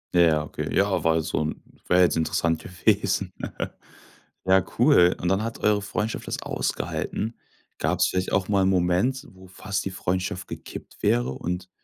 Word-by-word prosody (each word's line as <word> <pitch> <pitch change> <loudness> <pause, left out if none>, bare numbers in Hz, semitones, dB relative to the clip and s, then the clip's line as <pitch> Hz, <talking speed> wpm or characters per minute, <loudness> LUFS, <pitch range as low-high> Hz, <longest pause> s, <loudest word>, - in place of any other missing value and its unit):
Ja, 80 -3 +5
okay. 75 - -5
Ja, - - +2
war 80 -1 +3
halt 80 - +1
so 70 - -1
'n 75 0 -4 0.2
wäre 90 +1 +5
jetzt 90 - +4
interessant 80 0 +1
gewesen. 90 +1 0 1.1
Ja 95 0 +5 0.2
cool 90 0 +5
und 90 - -2
dann 95 +2 +2
hat 115 +1 -4
eure 105 -1 +3
Freundschaft 105 +2 -3
das - - -3
ausgehalten. 110 +3 -3 0.4
Gab's - - +2
vielleicht 90 0 -1
auch 95 -2 +1
mal 100 -2 +3
'n - - +3
Moment, 95 +10 +1
wo 95 0 -15
fast 100 +2 -4
die - - -1
Freundschaft 90 0 -2
gekippt - - -9
wäre - - +2
und 90 +6 -4
90 Hz, 165 wpm, -25 LUFS, 85-100 Hz, 1.1 s, Ja